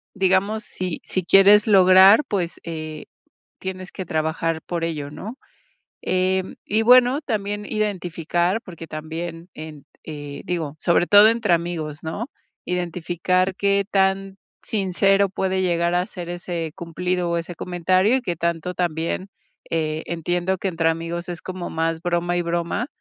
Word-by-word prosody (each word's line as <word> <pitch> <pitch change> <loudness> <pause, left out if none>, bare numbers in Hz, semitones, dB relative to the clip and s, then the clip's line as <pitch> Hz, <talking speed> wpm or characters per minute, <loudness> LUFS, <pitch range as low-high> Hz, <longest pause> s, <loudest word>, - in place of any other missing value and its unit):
Digamos, 195 +3 +1
si 185 -2 -4
si 185 - -2
quieres 200 +4 +6
lograr, 190 +3 +7
pues 180 -4 -2
eh, 155 -2 -6 0.5
tienes 185 0 -6
que 190 - -6
trabajar 160 0 -1
por 170 0 -4
ello, 150 -3 -4
¿no? 220 - -8 0.7
Em, 185 0 0
y 215 +2 +1
bueno, 250 +3 +6
también 205 -6 -3
identificar, 180 -2 -1
porque 170 -3 -9
también 165 +3 -6
en 155 -2 -9 0.2
eh, 145 -2 -7
digo, 165 -5 -3
sobre 175 +1 +2
todo 205 +2 +8
entre 225 -4 +1
amigos, 165 -3 -3
¿no? 205 - -5 0.3
Identificar, 180 +1 -1
qué 200 0 +2
tan 195 0 +1 0.2
sincero 195 -1 +2
puede 190 0 -1
llegar 170 -1 +1
a 180 +1 +1
ser 175 -3 -8
ese 175 -2 -4
cumplido, 180 0 -2
o 170 - 0
ese 170 +1 -6
comentario, 185 +7 +2
y 260 - -2
qué 175 -7 -3
tanto 170 +2 -2
también, 170 +2 -2 0.4
eh, 155 -1 -1
entiendo 175 +3 -1
que 195 - -2
entre 165 -2 +1
amigos, 165 +2 -3
es 175 -2 -6
como 185 -1 -6
más 165 0 -1
broma 175 0 0
y 175 - +1
broma, 170 +7 -2
175 Hz, 145 wpm, -22 LUFS, 165-190 Hz, 0.7 s, todo